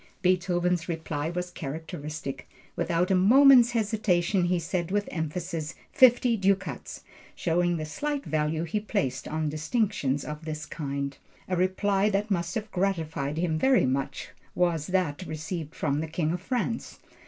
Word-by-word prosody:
Beethoven's 180 -2 +1
reply 160 -2 -2
was 180 +1 -4
characteristic. 150 -3 -6 0.3
Without 175 +2 0
a - - +5
moment's 245 +5 +7
hesitation 200 -5 +1
he 180 0 +2
said 170 0 -2
with 205 +1 0
emphasis, 160 0 -3 0.2
"fifty 245 -3 +6
ducats!" 195 -1 -1 0.3
showing 175 0 +1
the 155 - -3
slight 285 - -3
value 155 +1 0
he 170 +6 -1
placed 190 - -2
on 155 0 -1
distinctions 155 - 0
of 150 +1 -6
this 155 -1 -4
kind. 140 -3 -4 0.3
A 185 - 0
reply 195 +3 +2
that 210 +1 -1
must 170 -2 -1
have 215 -1 -4
gratified 160 -6 -1
him 165 -2 0
very 265 - +4
much 135 +1 -2 0.3
was 170 -4 +1
that 180 -5 0
received 160 0 -5
from 145 -1 0
the 160 - -2
King 160 0 -1
of 175 +1 -3
France. 240 +1 -2
175 Hz, 145 wpm, -27 LUFS, 155-195 Hz, 0.3 s, moment's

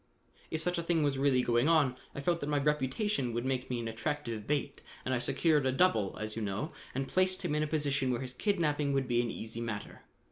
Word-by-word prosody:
"If 160 - -2
such 180 0 0
a - - 0
thing 165 -2 +1
was 140 -2 +1
really 135 -2 +3
going 120 +5 +3
on, 150 -6 +4 0.2
I 140 - -4
felt 170 +4 +1
that 145 - -3
my 145 - +2
reputation 145 - 0
would 120 +2 -2
make 130 -1 -1
me 125 -1 -1
an 115 - -4
attractive 115 -2 -3
bait 145 -1 -1 0.2
and 130 - 0
I 125 - +1
secured 150 +3 +2
a - - +3
double, 130 - +2
as 110 0 -4
you 115 - -3
know, 105 +9 -2 0.2
and 135 0 -1
placed 185 0 +2
him - - 0
in 150 - +1
a 155 - +1
position 140 -3 +1
where 120 -1 0
his 130 -1 -5
kidnapping 150 - +1
would 135 -1 +1
be 120 -1 +2
an 120 - -2
easy 115 +1 -5
matter. 110 -3 -5
135 Hz, 240 wpm, -32 LUFS, 120-150 Hz, 0.2 s, on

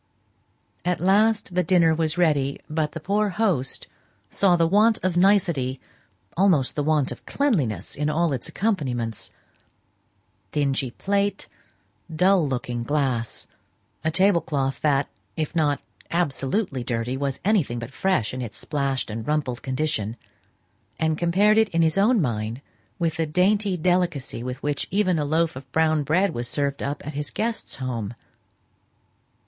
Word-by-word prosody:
At 180 0 0
last 205 +2 +2
dinner 175 -2 +4
was 160 +1 -1
ready, 145 -5 +2
but 155 -1 -1
the 165 - -5
poor 205 +5 +1
host 185 - 0 0.5
saw 190 -3 +4
the 170 -1 +3
want 210 +6 +4
of 185 -2 0
nicety 170 -9 +2 0.6
almost 165 -9 +3
the 150 - 0
want 150 -2 +1
of - - -8
cleanliness, 180 - 0
in 150 +1 -1
all 160 0 +1
its 130 - -4
accompaniments 130 - -2 1.2
dingy 140 -3 0
plate, 200 +9 -1 0.6
dull 180 0 +3
looking 120 -2 -3
glass, 130 -5 -1 0.6
a 160 - +2
table 185 +1 +3
cloth 135 -4 -2
that, 145 -2 +2 0.3
if 155 +1 -3
not 150 -3 +2 0.3
absolutely 145 - -1
dirty, 120 +1 -2
was 135 0 -2
anything 185 - +2
but 115 +1 -6
fresh 185 - 0
in 130 - -4
its 115 -3 -6
splashed 140 -5 -2
and 110 +1 -5
rumpled 145 -5 -1
condition, 130 -5 -2 0.8
and 160 -1 +1
compared 195 +6 +3
it 220 -1 +3
in 165 -1 +2
his 160 +4 +2
own 225 +3 +4
mind 115 - -2 0.4
with 165 -2 -1
the 165 -1 0
dainty 190 +4 +2
delicacy 170 -8 0
with 125 +2 -6
which 145 -1 -1
even 185 -4 +1
a 150 - 0
loaf 160 +1 +1
of 130 0 -10
brown 155 +1 +2
bread 170 +6 +1
was 120 0 -4
served 140 0 -1
up 140 +1 -4
at 150 - -5
his 145 +1 -3
guest's 230 +1 -2
home. 120 -4 -4
155 Hz, 145 wpm, -24 LUFS, 135-180 Hz, 1.2 s, dinner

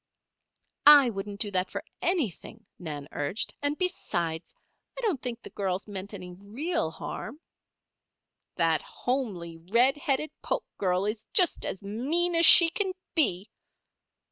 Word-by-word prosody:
"I 285 -5 +9
wouldn't 200 0 -6
do 205 - +2
that 185 0 0
for - - -5 0.2
anything," 230 - -2
Nan 150 -5 -6
urged. 145 +9 -3
"And, 290 +1 -1
besides, 175 - -3 0.4
I - - -5
don't 390 - -1
think 240 -2 -4
the - - -9
girls 190 0 -3
meant 200 0 -6
any 180 -2 -9
real 210 - -3
harm." 220 - -7 1.2
"That 165 -2 +2
homely, 200 -11 -4
red 235 - +2
headed 295 -1 -1
Polk - - -2
girl 185 0 +1
is 215 +1 -4
just 360 -3 +2
as 195 - -5
mean 285 - 0
as 335 0 +6
she 335 -2 +9
can 380 +1 -1 0.2
be!" 210 - +1
215 Hz, 140 wpm, -28 LUFS, 185-295 Hz, 1.2 s, I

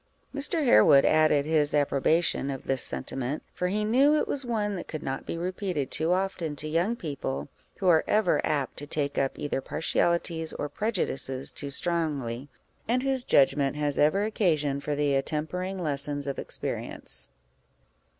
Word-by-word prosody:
Mr. 290 +2 +1
Harewood 135 - +6
added 155 -2 +4
his 150 -2 +2
approbation 145 +1 +1
of 135 -1 -5
this 135 -1 0
sentiment, 135 +3 -3
for 180 - -1
he 210 +3 0
knew 270 +7 +4
it - - +1
was 280 - -1
one 215 -4 -1
that 180 - -6
could 155 -1 -6
not 135 0 -4
be - - -3
repeated 180 -5 -3
too 160 +2 0
often 180 -4 -1
to 155 - -5
young 170 +9 +1
people, 145 - -4 0.3
who 190 - -1
are 165 -3 +5
ever 210 -4 +2
apt 145 -4 -1
to 145 - -7
take 145 -1 -1
up 135 -1 -1
either 145 -2 -2
partialities 165 +2 0
or 145 - -3
prejudices 140 - -2
too 140 - -3
strongly, 140 -5 -2 0.4
and 250 +3 +1
whose 265 -2 0
judgment 140 - +3
has 145 -1 -1
ever 155 +7 +3
occasion 155 -10 +1
for 145 +1 -3
the 145 -1 +1
attempering 160 +7 -2
lessons 145 -3 -1
of 140 -1 -3
experience. - - -3
155 Hz, 160 wpm, -27 LUFS, 140-185 Hz, 0.4 s, Harewood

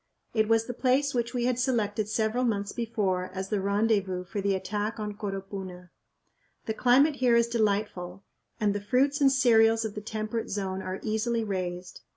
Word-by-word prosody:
It 220 -2 +2
was 225 0 +3
the 245 - -5
place 270 +3 +1
which 240 0 -1
we 240 -1 0
had 250 -1 +1
selected 220 -5 0
several 220 +3 0
months 205 -4 -1
before 205 -6 -1
as 190 0 -4
the 210 -3 0
rendezvous 200 -2 +1
for 200 +3 -4
the 195 0 +1
attack 205 +4 -3
on 210 -1 -3
Coropuna. 195 -3 -6 0.7
The 220 - -1
climate 275 +6 +4
here 245 -2 +3
is 235 0 +4
delightful 200 -5 -1 0.4
and 210 -2 +2
the 205 - -3
fruits 275 +7 +1
and 275 -1 +6
cereals 225 -3 +4
of 215 - -4
the 210 - -6
temperate 215 +1 -4
zone 190 -1 -3
are 185 0 -5
easily 225 +1 0
raised. 180 -3 -4
215 Hz, 180 wpm, -28 LUFS, 195-235 Hz, 0.7 s, and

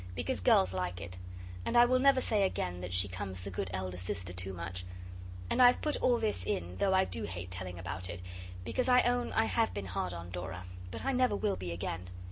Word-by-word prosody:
Because 80 +4 -1
girls 95 0 +4
like 90 -1 -2
it. 90 0 -7 0.4
And - - +1
I 240 - +9
will 255 +1 +3
never 270 0 +5
say 215 -4 +2
again 90 - 0
that 90 0 -5
she 90 +2 +3
comes 95 -1 -5
the 100 +2 -6
good 95 +1 -3
elder 90 0 -3
sister 90 0 -3
too 95 +1 -4
much. 90 0 -5 0.6
And - - +2
I 250 - +11
have 245 - +4
put 300 -1 +1
all 245 -1 +3
this 215 - -1
in 90 0 -2
though 190 - +3
I 190 0 +5
do 110 - -4
hate 90 -2 -6
telling 90 0 -5
about 90 +2 -5
it, 85 +1 -5 0.5
because 255 - 0
I 250 0 +7
own 245 0 +1
I - - +3
have 95 -3 +1
been 100 -1 -3
hard 90 -1 -2
on 85 0 -7
Dora, 90 +1 -5 0.3
but - - -5
I 270 - +2
never 255 -4 +3
will 205 -1 0
be 90 -2 -5
again. 90 +1 -4
95 Hz, 235 wpm, -32 LUFS, -, 0.6 s, I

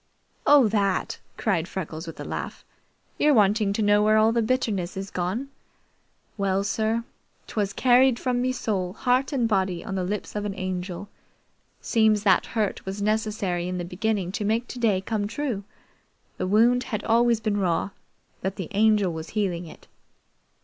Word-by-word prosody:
"Oh, 285 -5 +7
that!" 200 -3 0 0.2
cried 180 -6 0
Freckles 165 -3 -6
with 165 - -8
a - - -4
laugh. - - -6 0.5
"You're 295 -1 +4
wanting 210 -1 +3
to 215 - 0
know 205 0 +4
where 215 +1 +4
all 220 +1 +5
the 235 0 +1
bitterness 215 -7 -1
is 195 0 -5
gone? 190 +10 -2 0.9
Well 195 0 +1
sir, 220 +2 0 0.4
'twas 205 -2 -2
carried 255 +1 +4
from 250 -1 -1
me 255 +1 +1
soul, 195 -7 -2
heart, 255 +5 +1
and 250 -5 +1
body 190 -5 0
on - - -4
the 190 -1 -1
lips 205 +4 -4
of 210 - -2
an 205 -2 -3
Angel. 185 0 -4 0.7
Seems 220 -3 +2
that 190 -4 +3
hurt 210 -2 0
was 190 +1 -5
necessary 205 -4 -1
in 180 0 -3
the 175 - -3
beginning 190 +1 -1
to 210 - -3
make 225 +4 0
today 225 -6 0
come 205 0 -2
true. 230 -3 -3 0.7
The - - -2
wound 235 +5 +4
had 215 -4 -3
always 235 0 +3
been 215 -2 -1
raw, 185 0 0 0.5
but 190 +1 -2
the 185 -5 -6
Angel 210 -3 +3
was 160 0 -6
healing 180 -4 -1
it. - - -14
205 Hz, 170 wpm, -25 LUFS, 190-225 Hz, 0.9 s, Oh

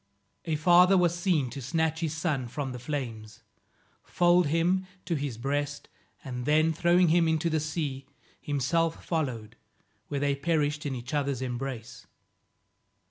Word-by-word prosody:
A 160 -2 0
father 180 +4 +6
was 175 -2 +3
seen 170 -8 0
to 135 - -6
snatch 160 +4 0
his 160 -2 -2
son 150 -7 -1
from 135 +2 -4
the 125 - -6
flames, 115 -6 -5 0.6
fold 175 -1 +3
him 175 +5 +1 0.2
to 175 - -1
his 140 -6 -3
breast, 145 +3 -3 0.3
and, 125 -1 -5
then 155 +2 +3
throwing 175 +2 +3
him 170 0 +4
into 160 +1 +1
the 160 - +1
sea, 150 -3 -3 0.3
himself 155 +4 0
followed, 120 -9 -3 0.5
where 145 - -2
they 140 0 +1
perished 150 0 0
in 135 - -3
each 125 +3 -7
other's 140 -3 -1
embrace. 125 -2 -5
150 Hz, 145 wpm, -28 LUFS, 135-165 Hz, 0.6 s, father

